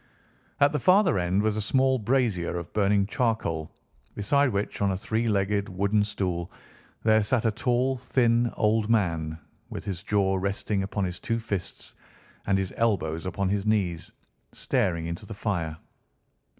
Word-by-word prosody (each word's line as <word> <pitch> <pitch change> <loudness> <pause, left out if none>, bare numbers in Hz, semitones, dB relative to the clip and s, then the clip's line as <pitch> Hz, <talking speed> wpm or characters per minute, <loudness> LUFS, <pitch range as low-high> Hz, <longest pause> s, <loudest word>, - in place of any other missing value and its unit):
At 140 0 +5
the 150 - -1
farther 185 - +4
end 90 +3 +1
was 110 -1 +1
a 110 - -1
small 130 +4 +2
brazier 110 -7 0
of 85 -1 -7
burning 100 -1 +3
charcoal, 105 - -1 0.5
beside 140 +7 +2
which 100 -2 -3
on 100 - +3
a - - -2
three 110 +4 -1
legged 100 -1 0
wooden 100 +3 +1
stool 90 -4 -3 0.5
there 110 0 +4
sat 115 +3 +1
a 110 - +3
tall, 125 +4 0
thin 120 -1 +2
old 110 0 +2
man, 80 -8 0 0.3
with - - -7
his 95 -4 -4
jaw 95 -2 +1
resting 100 +1 -1
upon 100 +1 -2
his 90 0 -4
two 115 +4 -1
fists, 100 -5 -5 0.5
and 100 -1 +3
his 95 -1 -2
elbows 95 -7 0
upon 100 +1 -1
his 100 0 0
knees, 95 -6 0 0.4
staring 85 -2 0
into 85 0 -6
the 110 - -7
fire. 85 -7 -2
100 Hz, 160 wpm, -26 LUFS, 95-115 Hz, 0.5 s, At